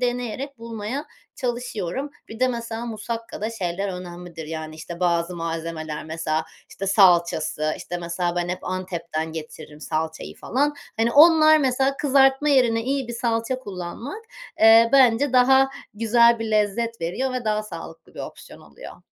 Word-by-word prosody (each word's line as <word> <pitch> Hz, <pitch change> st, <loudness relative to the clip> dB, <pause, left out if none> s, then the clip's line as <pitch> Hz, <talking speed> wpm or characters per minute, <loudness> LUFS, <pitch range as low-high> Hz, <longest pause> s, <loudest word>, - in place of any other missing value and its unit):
deneyerek 250 Hz, +2 st, -3 dB
bulmaya 230 Hz, +4 st, -5 dB, 0.3 s
çalışıyorum. 245 Hz, 0 st, -3 dB, 0.2 s
Bir 220 Hz, +2 st, -10 dB
de, 255 Hz, -, +4 dB
mesela, 235 Hz, -1 st, -4 dB
musakkada 225 Hz, 0 st, -5 dB
şeyler 195 Hz, -2 st, -3 dB
önemlidir. 175 Hz, -3 st, -8 dB
Yani, 155 Hz, 0 st, -6 dB
işte, 170 Hz, +2 st, -9 dB
bazı 170 Hz, 0 st, 0 dB
malzemeler, 165 Hz, -2 st, -4 dB
mesela, 160 Hz, 0 st, -2 dB, 0.3 s
işte, 195 Hz, -, -6 dB
salçası, 170 Hz, -5 st, +3 dB
işte, 175 Hz, -, -6 dB
mesela 175 Hz, +1 st, -2 dB
ben 175 Hz, 0 st, -1 dB
hep 180 Hz, +1 st, -4 dB
Antep'ten 170 Hz, -4 st, -4 dB
getiririm 155 Hz, -1 st, -9 dB
salçayı 160 Hz, +1 st, -4 dB
falan. 290 Hz, +4 st, -1 dB, 0.2 s
Hani, 230 Hz, +1 st, +1 dB
onlar, 310 Hz, 0 st, +7 dB
mesela, 270 Hz, 0 st, +1 dB
kızartma 270 Hz, +1 st, +3 dB
yerine 240 Hz, -5 st, +3 dB
iyi 265 Hz, 0 st, -2 dB
bir -, -, -4 dB
salça 230 Hz, +2 st, -1 dB
kullanmak, 225 Hz, -, -7 dB, 0.4 s
eee, 225 Hz, +1 st, +8 dB
bence 260 Hz, 0 st, +5 dB
daha 265 Hz, +1 st, +5 dB, 0.2 s
güzel 235 Hz, +2 st, +4 dB
bir 225 Hz, -1 st, -4 dB
lezzet 215 Hz, +2 st, 0 dB
veriyor 220 Hz, +11 st, -2 dB
ve 250 Hz, -1 st, -3 dB
daha 215 Hz, 0 st, 0 dB
sağlıklı 165 Hz, -5 st, -10 dB
bir -, -, -7 dB
opsiyon -, -, -10 dB
oluyor. -, -, -13 dB
220 Hz, 145 wpm, -23 LUFS, 170-250 Hz, 0.4 s, eee